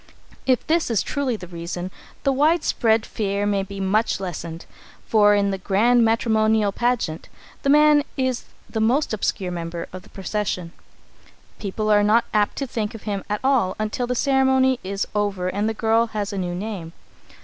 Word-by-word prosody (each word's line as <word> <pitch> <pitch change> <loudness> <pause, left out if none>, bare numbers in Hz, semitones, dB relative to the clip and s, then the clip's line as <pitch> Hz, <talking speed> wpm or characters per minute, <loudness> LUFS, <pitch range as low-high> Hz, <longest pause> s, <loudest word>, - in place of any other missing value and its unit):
If 255 -2 +2
this 330 -2 +1
is 225 -5 +1
truly 275 -4 -1
the 195 - -8
reason, 175 +1 -6 0.3
the 275 - +2
widespread 265 -7 +2
fear 200 -1 -2
may 200 -1 +1
be 195 0 -7
much 195 +3 +1
lessened, 170 -3 -6 0.4
for 205 -2 +5
in 200 -1 +2
the 195 - -3
grand 230 +6 +3
matrimonial 220 -2 +2
pageant, 235 -8 -1 0.3
the 275 - 0
man 300 0 +6
is 260 -2 -1 0.2
the 220 - -3
most 245 +4 +2
obscure 195 -3 -1
member 170 -1 -5
of 185 - -7
the 195 - -19
procession. 190 -3 -3 0.9
People 215 +1 -2
are 205 0 +5
not 215 +3 +3
apt 210 -1 +2
to 275 - -1
think 225 -4 -3
of 220 - -10
him 200 -3 -3
at 210 0 -2
all 260 -9 +2
until 215 +3 -2
the 250 - -1
ceremony 265 -1 +3
is 195 +1 -2
over 200 -3 -1
and 205 +3 -1
the - - 0
girl 225 +1 +2
has 210 -2 -3
a - - -3
new 175 -1 -2
name. 185 -4 -5
215 Hz, 175 wpm, -23 LUFS, 195-240 Hz, 0.9 s, man